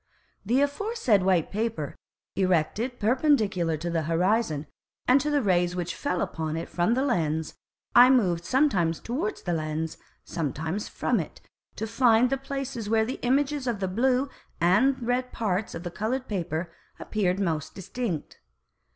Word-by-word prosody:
The 245 +7 +2
aforesaid 285 - +1
white 185 -3 +2
Paper, 215 - -2 0.4
erected 195 +7 0
perpendicular 210 - +2
to 170 +3 -4
the 165 -1 +1
Horizon, 165 0 +1 0.4
and 260 +2 +5
to 300 - -1
the 290 -3 +2
Rays 175 -2 +2
which 175 -1 -2
fell 180 - -2
upon 160 -1 -3
it 165 - -4
from 180 +7 +1
the 260 - +1
Lens, 160 - 0 0.4
I 245 +1 +9
moved 185 -10 +3
sometimes 190 - +2
towards 320 - -3
the 175 - -1
Lens, 155 0 -3 0.2
sometimes 160 +5 -3
from - - 0
it, - - -6 0.4
to 220 - -3
find 230 +1 +4
the 270 - +2
Places 270 -5 -5
where 220 0 +3
the 255 - -4
Images 275 +2 +1
of 230 -4 -1
the 190 - -1
blue 250 +7 +2 0.3
and 210 +11 +3
red 250 +1 0
Parts 205 -2 -2
of 165 - -6
the 175 - -5
coloured 250 +7 -2
Paper 175 -4 -3 0.3
appeared 195 -3 0
most 160 -5 -2
distinct. 190 -3 -4
210 Hz, 155 wpm, -27 LUFS, 170-255 Hz, 0.4 s, I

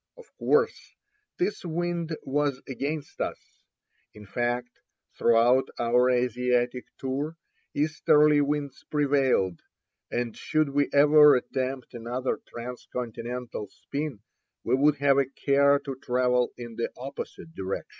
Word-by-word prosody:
Of - - -13
course 455 0 +1 0.4
this 375 +4 -1
wind 170 -1 -2
was 140 -1 -1
against 145 +2 -4
us. - - -2 0.8
In 105 0 -12
fact, 120 +4 -2 0.4
throughout 120 +3 +4
our 120 +2 +3
Asiatic 125 0 +1
tour 140 +5 -3 0.4
easterly 150 0 +4
winds 145 -1 -2
prevailed; 135 - +2 0.5
and 120 -2 -2
should 155 -2 0
we 145 0 +1
ever 150 0 +7
attempt 130 +1 -3
another 120 +2 -3
transcontinental 120 -1 -6
spin 140 +2 -5 0.4
we 120 - 0
would 145 +3 +4
have 140 0 +4
a 140 - +3
care 140 +1 +3
to 140 -1 -6
travel 125 0 +1
in 120 -2 -8
the 115 - -1
opposite 140 +5 -8
direction. 95 -5 -4
135 Hz, 115 wpm, -27 LUFS, 120-145 Hz, 0.8 s, ever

